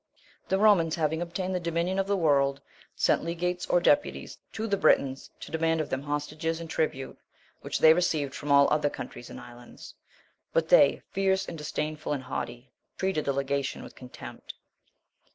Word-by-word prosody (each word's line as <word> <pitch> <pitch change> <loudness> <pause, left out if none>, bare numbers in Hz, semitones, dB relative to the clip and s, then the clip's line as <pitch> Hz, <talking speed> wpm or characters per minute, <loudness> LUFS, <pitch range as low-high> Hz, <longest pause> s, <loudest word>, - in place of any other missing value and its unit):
19.* - - -31
The 190 - +2
Romans, 195 -6 +4
having 160 0 0
obtained 180 +2 -3
the 180 - 0
dominion 170 +2 -1
of 195 - 0
the 200 0 +1
world, 140 -4 +2 0.4
sent - - +2
legates 175 +1 -2
or 175 - +3
deputies 290 +11 +1
to 220 - -3
the 205 -3 +1
Britons 135 -8 +2
to - - -9
demand 165 0 +1
of 155 - -3
them 130 - -1
hostages 150 +3 -3
and 165 - -7
tribute, 145 -4 -2 0.4
which - - -3
they 160 - +7
received 155 -5 0
from 145 - -4
all 140 0 +7
other 150 -1 +2
countries 120 - -8
and - - -9
islands; 120 0 -12 0.6
but - - +1
they, - - +5
fierce, 190 -1 +1
disdainful, 150 -1 -4
and 135 -2 -4
haughty, 125 -1 -6 0.3
treated 190 -5 -1
the 140 - +1
legation 140 0 -2
with - - -11
contempt. 125 -1 -10
160 Hz, 170 wpm, -28 LUFS, 140-180 Hz, 0.6 s, they